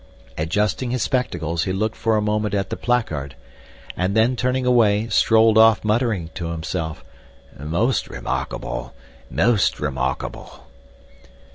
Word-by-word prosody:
Adjusting 105 +10 -1
his 125 -2 -1
spectacles 85 - -1
he 95 - -1
looked 110 +4 -1
for 115 -1 +1
a 105 - 0
moment 105 -1 0
at 100 -1 -2
the - - -1
placard 80 - -1 0.6
and 95 +4 0
then, 115 +3 +3
turning 125 +1 0
away, 115 -3 +3
strolled 110 -1 +4
off 110 -1 +5
muttering 105 -6 0
to 85 -2 -4
himself: 80 -1 -4 0.5
"Most 85 - -1
remarkable—most 60 - -2
remarkable!" 65 -2 -4
105 Hz, 120 wpm, -22 LUFS, 80-115 Hz, 0.6 s, off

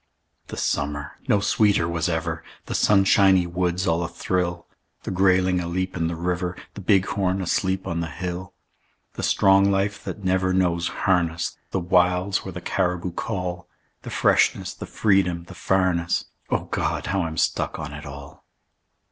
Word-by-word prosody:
The - - -7
summer 75 0 -2
no 105 - +4
sweeter 100 -3 +2
was 85 +1 -1
ever; 80 -1 -2 0.2
The - - -5
sunshiny 95 -2 +4
woods 90 +1 -1
all 85 +1 +1
athrill; 85 0 -2 0.4
The - - -4
grayling 95 -1 +3
aleap 90 +2 -2
in 85 -2 0
the 85 - -3
river, 90 +1 -2 0.2
The 100 - -8
bighorn 95 -1 +1
asleep 95 +1 0
on 85 - -2
the 85 -1 -3
hill. 90 +2 -5 0.6
The - - -6
strong 95 +1 +4
life 100 +1 0
that 105 - -6
never 95 0 +1
knows 85 -2 +1
harness; 90 -5 0
The 95 - -1
wilds 90 +2 +2
where 95 - -6
the 90 0 -7
caribou 90 0 -1
call; 90 -2 -4 0.3
The - - -8
freshness, - - +2
the - - -8
freedom, 95 -5 +1
the 85 - -12
farness 90 -3 +1 0.2
O - - 0
God! - - -2
how 95 0 0
I'm 80 -2 -4
stuck - - 0
on 75 0 -6
it 75 +1 -8
all. 70 0 -10
90 Hz, 155 wpm, -24 LUFS, 85-95 Hz, 0.6 s, no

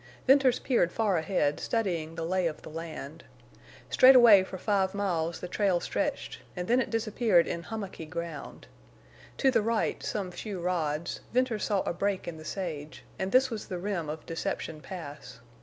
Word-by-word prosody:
Venters 265 -2 +5
peered 235 -10 +1
far 215 -4 +1
ahead, 160 -3 0
studying 175 -8 -1
the 165 - -3
lay 185 0 +1
of 155 - -6
the - - -9
land. 160 -2 -7 0.7
Straightaway 240 -7 +8
for 190 - -7
five 195 0 0
miles 170 -5 -1
the - - -4
trail 185 -1 +1
stretched, - - -3 0.2
and 180 -1 -4
then 245 +2 +4
it - - -3
disappeared 220 -5 +2
in 170 - -3
hummocky 195 -5 -6
ground. 165 -2 -6 0.7
To 265 - +4
the 230 -3 +3
right, 225 +1 0
some 195 -4 -3
few 195 +1 -6
rods, 170 -3 -1
Venters 245 -3 +1
saw 200 -3 +1
a - - -2
break 195 +1 -1
in 170 -2 -5
the 155 - -11
sage, 155 -5 -5 0.2
and 190 0 -2
this 260 0 +4
was 220 -2 -5
the 180 - -4
rim 175 -4 -3
of 155 +1 -6
Deception 160 -1 -4
Pass. 150 -9 -9
185 Hz, 175 wpm, -29 LUFS, 165-215 Hz, 0.7 s, Straightaway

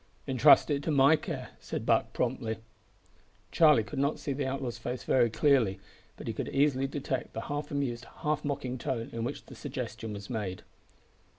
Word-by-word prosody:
"Intrust 130 +2 +6
it 140 -1 +1
to 155 - -3
my 140 +1 +6
care," 150 -5 -5
said - - -5
Buck - - +2
promptly. 120 -3 -1 0.9
Charlie 150 -8 +6
could 125 +6 -6
not 140 +2 +1
see 140 - -3
the 135 0 -2
outlaw's 130 -3 -3
face 120 -3 -4
very 120 +2 +3
clearly, 115 -6 +3 0.4
but - - -9
he - - -2
could - - -4
easily 135 -1 +2
detect 135 -2 -3
the 115 - -3
half 145 +4 -4
amused 130 -5 -2 0.2
half 150 -1 0
mocking 135 -3 -3
tone 120 -4 -3
in 115 0 -3
which 125 +5 -4
the - - -12
suggestion 120 -6 -5
was 100 0 -7
made. 105 -6 -4
130 Hz, 180 wpm, -30 LUFS, 115-145 Hz, 0.9 s, Intrust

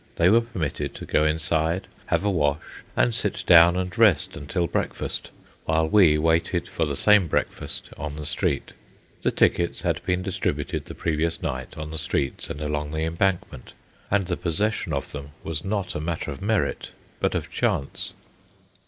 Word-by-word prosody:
They 85 +2 +4
were 115 +4 +6
permitted 105 - -4
to - - -7
go 75 - +2
inside, 80 +3 0 0.2
have - - +1
a - - +3
wash, 75 -4 -1 0.2
and 120 - +3
sit 110 -3 -2
down 85 +1 +7
and 90 0 -2
rest 105 -10 +4
until 85 +5 -1
breakfast, - - -3 0.4
while 80 0 +2
we 80 -4 +6
waited 80 +2 +1
for 80 - -1
the 70 - -2
same 105 +1 +5
breakfast - - -3
on 75 0 -4
the 75 -1 -6
street. 85 -2 -1 0.5
The - - +2
tickets 85 -1 +2
had - - -1
been 90 0 0
distributed 95 -1 -2
the - - -9
previous 80 0 -1
night 65 0 -4
on 75 0 -5
the 80 - -3
streets 70 -2 -1
and 75 - -5
along 75 0 -2
the 80 0 -1
Embankment, 85 -4 -1 0.4
and 100 -1 +2
the 90 0 -2
possession 90 +2 0
of 70 -2 -2
them 70 0 -8
was 80 0 -2
not 100 -2 -2
a - - -3
matter 80 -1 -3
of 70 - -8
merit, 105 0 0 0.3
but - - 0
of - - -3
chance. 70 - -1
80 Hz, 175 wpm, -25 LUFS, 75-95 Hz, 0.5 s, down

